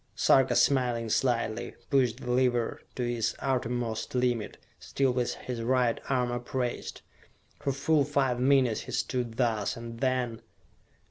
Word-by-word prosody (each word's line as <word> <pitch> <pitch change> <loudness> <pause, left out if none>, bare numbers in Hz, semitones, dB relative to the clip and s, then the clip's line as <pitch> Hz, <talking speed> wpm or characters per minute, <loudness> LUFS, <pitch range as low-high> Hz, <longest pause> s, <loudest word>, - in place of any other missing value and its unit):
Sarka, 135 -1 +4
smiling 120 -4 +2
slightly, 120 -1 0 0.2
pushed 130 -3 +2
the 125 - -3
lever 125 -2 +1
to 125 - -2
its 120 -2 -1
uttermost 120 -3 -2
limit, 125 -3 0 0.2
still 135 -2 0
with 125 -1 -1
his 125 -2 -5
right 125 0 +1
arm 125 -2 +1
upraised. 120 0 -3 0.6
For 140 - -1
full 140 +2 +2
five 135 -3 0
minutes 130 -3 +3
he - - -8
stood 120 -3 -2
thus, 115 -5 0
and 115 0 -8
then.... 125 -3 -1
125 Hz, 135 wpm, -29 LUFS, 120-130 Hz, 0.6 s, Sarka